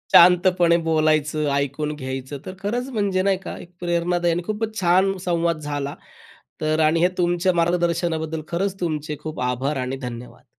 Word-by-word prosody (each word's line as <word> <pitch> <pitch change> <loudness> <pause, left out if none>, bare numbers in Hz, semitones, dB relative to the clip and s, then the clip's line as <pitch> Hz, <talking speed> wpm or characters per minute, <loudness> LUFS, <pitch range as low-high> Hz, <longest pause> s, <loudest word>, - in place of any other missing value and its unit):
शांतपणे 175 -1 +6
बोलायचं, 155 -2 +1
ऐकून 140 +2 -1
घ्यायचं 130 0 -5
तर 185 - -6
खरंच 240 +6 -2
म्हणजे 200 -6 0
नाही 195 -1 +2
का? 195 - -7
एक 175 - -12
प्रेरणादायी 175 0 +1
आणि 175 +1 -2
खूपचं 215 +1 -2
छान 190 +2 +3
संवाद 170 -2 +1
झाला. 145 -1 -4 0.7
तर 155 0 +1
आणि 160 +1 +3
हे 175 - +6
तुमच्या 175 +1 +2
मार्गदर्शनाबद्दल 170 -2 0
खरचं 195 +3 -2
तुमचे 155 -3 -2
खूप 155 -4 -5
आभार 125 +3 -1
आणि 130 +1 -3
धन्यवाद. 120 0 -9
170 Hz, 155 wpm, -23 LUFS, 150-180 Hz, 0.7 s, शांतपणे